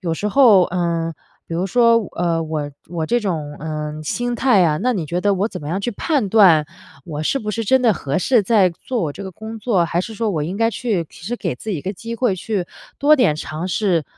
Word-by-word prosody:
有 170 -3 -2
时 205 +5 -2
候， 215 -6 +6
呃， 170 -2 -1 0.3
比 165 - -5
如 175 +3 -1
说， 230 +3 +4 0.2
呃， 170 -1 0
我 155 -2 -3 0.2
我 160 -2 -3
这 240 - +2
种， 155 -8 -3
呃， 155 0 -5
心 245 +10 -2
态 235 -7 +4
啊， 155 -3 +2
那 250 +1 +2
你 175 -9 -3
觉 175 +4 -2
得 205 +1 +2
我 195 +3 0
怎 - - -7
么 145 - -6
样 190 +4 -2
去 240 - -2
判 260 0 -1
断 185 -8 +5 0.4
我 150 -2 -5
是 275 - 0
不 215 -4 -4
是 225 +2 -3
真 260 +5 +3
的 230 -3 +5
合 145 -5 -2
适 240 +3 +3
再 195 -2 +3
做 235 +8 -4
我 150 -4 -2
这 200 - -8
个 190 - -6
工 220 +4 -8
作？ 205 -6 +1
还 170 +1 -1
是 220 +4 -6
说 220 0 -1
我 155 -5 -1
应 175 +6 -4
该 225 +1 +2
去 215 -7 -1
其 - - -15
实 235 - -2
给 - - -3
自 220 - -7
己 195 - -1
一 - - -6
个 190 - -4
机 230 +4 -7
会 230 -4 +1
去 190 0 -3 0.3
多 295 +2 +5
点 245 - +3
尝 155 +2 -5
试， 180 -5 +1
190 Hz, 265 characters per minute, -20 LUFS, 165-225 Hz, 0.4 s, 候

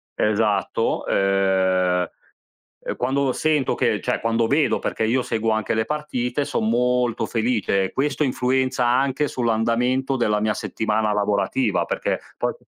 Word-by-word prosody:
esatto, 105 -2 0
ehm, 95 -2 +1 0.8
ehm, - - -3
quando 135 +2 0
sento 150 -3 +1
che - - 0
cioè, - - -1
quando 115 0 +1
vedo, 145 +5 +2
perché - - -2
io 125 +4 +1
seguo 115 -2 -1
anche 110 0 0
le 110 0 0
partite, 145 -3 -2
son 110 - -1
molto 125 0 +1
felice. 110 -5 0
Questo 145 +3 0
influenza 130 -1 0
anche 135 +4 +1
sull'andamento 120 +3 0
della 105 -3 +1
mia 105 0 0
settimana 110 -1 -1
lavorativa, 105 - 0
perché - - -2 0.2
poi - - -1
115 Hz, 135 wpm, -22 LUFS, 105-130 Hz, 0.8 s, vedo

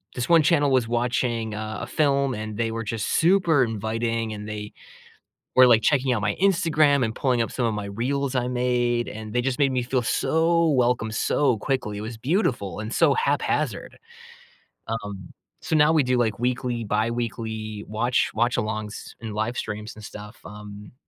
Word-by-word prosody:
this 125 -1 -3
one 165 -2 +6
channel 145 -2 +3
was 125 -3 +2
watching 120 -2 -1
a 110 0 -5
a - - -5
film, 140 -3 +1
and 110 0 -5
they 115 -1 -1
were 115 0 -3
just 110 -1 -3
super 170 -5 +3
inviting, 115 0 -2
and 105 0 -7
they 105 -1 -6 0.8
were, 130 - +9
like, 115 -2 +5
checking 135 -3 +2
out 115 - 0
my 105 -1 0
Instagram 160 -7 +3
and 110 0 -2
pulling 125 -3 +1
up 115 - -3
some 125 - -1
of 110 - 0
my 105 -1 -4
reels 130 +6 -2
I 125 0 0
made, 120 -1 0
and 110 0 -7
they 125 - +1
just 130 0 -1
made 140 -2 +3
me 130 -1 0
feel 125 +1 0
so 165 +7 +2
welcome 125 -5 +1
so 125 +2 +1
quickly; 105 -5 -2
it 105 - -5
was 110 +1 -6
beautiful 125 - -1
and 110 +1 -5
so - - +4
haphazard. 455 +1 -1 0.9
Um, 105 -5 -6 0.3
so - - -1
now 150 0 +5
we 155 -3 +3
do, 125 0 +1
like, 110 -4 0
weekly, 120 -1 -1
biweekly 110 -1 -3
watch 120 +4 0
watch-alongs 110 -2 -1 0.2
and 110 -3 -6
livestreams 105 -1 -3
and 110 - -12
stuff, 105 +2 -10
um. 105 +1 -10
120 Hz, 175 wpm, -24 LUFS, 110-130 Hz, 0.9 s, were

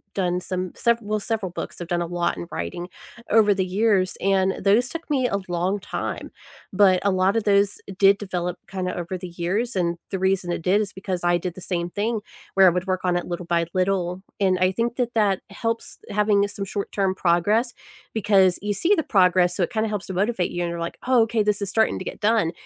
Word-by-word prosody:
done 180 -2 0
some 185 0 -4
sever 235 0 +2
well, 215 0 -2
several 210 -4 -3
books. 175 - -6
I've 175 - -5
done 175 0 0
a - - -1
lot 175 - -1
in 85 0 -6
writing 85 - -4 0.4
over 210 -2 +5
the 190 -1 -1
years, 190 -1 +1
and 190 -1 +2
those 210 +5 +4
took 330 +4 -7
me 265 -4 +2
a 200 - -1
long 180 +3 0
time. - - -5 0.4
But 190 -2 +5
a 200 - +3
lot 190 +2 +2
of 225 - +1
those 200 0 +2 0.2
did 195 0 +6
develop 180 -3 -3
kinda 185 -1 -3
over 175 +1 -4
the 180 0 -7
years, 185 +8 -2
and 170 -2 0
the 190 - -2
reason 190 -1 +1
it 175 - -2
did 185 +5 +3
is 210 -1 -4
because 190 -2 -4
I 175 0 +3
did 175 0 -5
the 185 - -10
same 175 -1 -2
thing 215 +4 -2 0.3
where 190 -1 +6
I - - +9
would 180 +1 -1
work 185 -1 0
on 180 -1 +2
it 175 - -3
little 175 0 -4
by 170 -1 +1
little. 185 -1 0 0.2
And 190 -2 +3
I 185 0 +3
think 235 +4 -1
that 240 -2 -1
that 200 -4 +2
helps 230 +3 -4
having, 205 -1 +2
eh - - -3
some 200 - -4
short-term 195 -1 -2
progress 205 +8 +2 0.4
because 195 -4 +3
you 205 +1 -1
see 335 - +2
the 320 - +1
progress, 180 - +3
so 185 - +1
it - - -2
kinda 220 -1 0
helps 210 -2 -3
to 190 - -6
motivate 195 0 0
you, 175 - -3
and 170 - -1
you're 170 0 -4
like, 170 0 -4
"Oh, 255 -3 +5
okay, 225 0 0
this 210 -1 +1
is 200 - -2
starting 220 +1 +2
to - - -6
get - - -6
done." 215 -6 +2
190 Hz, 235 wpm, -23 LUFS, 180-210 Hz, 0.4 s, I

